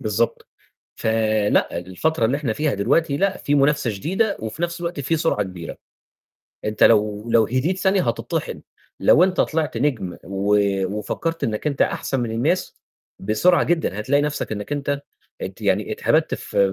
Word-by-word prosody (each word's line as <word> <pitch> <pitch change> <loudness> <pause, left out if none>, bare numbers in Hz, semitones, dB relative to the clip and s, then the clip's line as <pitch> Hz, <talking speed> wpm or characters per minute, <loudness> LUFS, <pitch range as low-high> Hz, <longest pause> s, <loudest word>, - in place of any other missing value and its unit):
بالضبط. 110 +2 -1 0.5
ف - - -9 0.5
لأ. - - +1
الفترة 115 - -1
اللي 125 +5 +1
إحنا 135 -7 -2
فيها 150 +2 0
دلوقتي، 140 +9 +1
لأ 195 +3 +1
في 145 - 0
منافسة 140 -3 +2
شديدة 190 - -1
وفي 110 +8 -6
نفس 175 0 -2
الوقت 170 -2 -4
في 145 +4 0
سرعة 155 -10 +1
كبيرة، 90 -3 -8 0.9
أنت 105 0 -2
لو 105 +2 +3
لو 115 -1 +5
هديت 135 - 0
ثانية 190 0 +2
هتِطحِن، 115 - -3 0.4
لو 170 - +6
أنت 185 -1 0
طِلِعت 155 -5 0
نجم، 115 -8 -1
و 100 +3 +1 0.4
وفكّرت 165 +10 -3
إنك 110 +4 -2
أنت 140 -3 +1
أحسن 135 - -1
من 120 -2 -2
الناس، 145 +11 -1 0.4
بسرعة 110 - +3
جدًا 160 - 0
هتلاقي 140 +6 +2
نفسك 150 -6 -2
إنك 105 +6 -5
أنت 140 0 -2 0.4
ات - - -6
يعني - - +1
اتهَبَدت - - +1
في - - -5
140 Hz, 160 wpm, -22 LUFS, 105-165 Hz, 0.9 s, لو